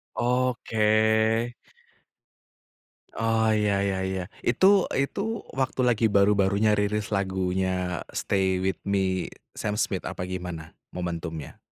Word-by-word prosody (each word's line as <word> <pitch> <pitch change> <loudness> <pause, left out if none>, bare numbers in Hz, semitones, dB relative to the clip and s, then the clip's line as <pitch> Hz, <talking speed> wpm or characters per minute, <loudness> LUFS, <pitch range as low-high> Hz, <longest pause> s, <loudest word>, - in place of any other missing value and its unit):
Oke. 125 -1 0 2.4
Oh 115 0 +2
iya 105 -2 +1
iya 100 -1 0
iya 95 0 -2 0.2
itu 125 +10 +3 0.3
itu 140 +8 -2 0.4
waktu 130 0 -1
lagi 115 -1 +1
baru-barunya 100 +1 +3
rilis 105 0 0
lagunya 95 -2 -1
"Stay 95 -1 0
With 95 0 -2
Me" 95 -2 0 0.2
Sam 105 0 -2
Smith 95 -4 -1
apa 90 - -5
gimana 90 -4 -6 0.2
momentumnya? 85 -3 -5
100 Hz, 100 wpm, -26 LUFS, 95-105 Hz, 2.4 s, itu